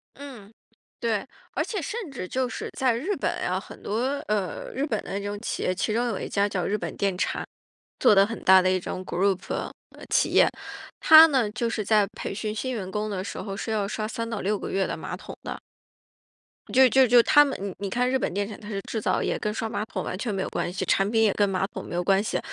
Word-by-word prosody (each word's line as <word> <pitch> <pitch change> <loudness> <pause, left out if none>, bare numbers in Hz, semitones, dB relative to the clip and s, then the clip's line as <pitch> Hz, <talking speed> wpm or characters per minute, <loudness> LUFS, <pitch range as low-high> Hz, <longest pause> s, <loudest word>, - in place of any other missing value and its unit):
嗯， 255 -8 -11 0.5
对。 220 -4 -1 0.3
而 - - 0
且 415 -5 -3
甚 420 +3 -5
至 185 -9 -6
就 255 +5 -1
是 - - -5
在 255 -4 +2
日 320 - -2
本 - - -2
呀， - - 0
很 - - -12
多， 215 +3 -2 0.3
呃， 200 -6 -2
日 270 +3 -1
本 225 -8 -2
的 195 - -4
这 200 - -6
种 205 0 -4
企 - - -3
业， 185 - +1
其 210 +3 -1
中 235 +2 +1
有 220 -5 -2
一 - - -4
家 200 0 +2
叫 190 -4 -2
日 210 - 0
本 - - -5
电 195 -2 0
产， - - -1 0.5
做 250 - +6
得 195 0 +6
很 225 +2 -6
大 190 0 +7
的 185 0 +2
一 185 - +1
种 185 +1 -5
group， 185 +1 +1
呃， - - -3 0.4
企 - - +3
业。 - - +5 0.5
它 315 0 +10
呢 260 -8 +1
就 235 +1 -1
是 220 -2 -2
在 210 -1 +4
培 195 - -6
训 215 +1 -3
新 255 +4 -3
员 195 -6 -4
工 210 +2 -2
的 190 -2 -3
时 - - -6
候， 195 -2 -5
是 220 - -4
要 210 -2 0
刷 215 +1 -3
3 230 +1 -4
到 225 -3 -3
6 205 +2 0
个 - - -5
月 195 0 +1
的 - - -3
马 - - -5
桶 - - -10
的。 - - -5 1.1
就 260 0 +7
就 265 +2 +5
就 240 0 +6
它 295 +4 +6
们 275 - -3
你 200 -1 -4
你 200 - -3
看 250 +5 +1
日 265 0 +1
本 - - -1
电 200 +1 -1
产， 210 - -9
它 210 - -11
是 200 -2 -3
制 220 - -2
造 - - +1
业， - - -1
跟 210 - -2
刷 225 0 -3
马 215 - -3
桶 190 -4 -4
完 - - -4
全 215 +1 -3
没 195 - -2
有 - - -3
关 - - -2
系， 185 - -3
产 195 +1 +2
品 225 0 +3
也 215 - +4
跟 205 - +2
马 195 -1 0
桶 - - -8
没 - - -6
有 175 - 0
关 195 +1 +3
系， 215 - -1
210 Hz, 285 characters per minute, -26 LUFS, 195-240 Hz, 1.1 s, 它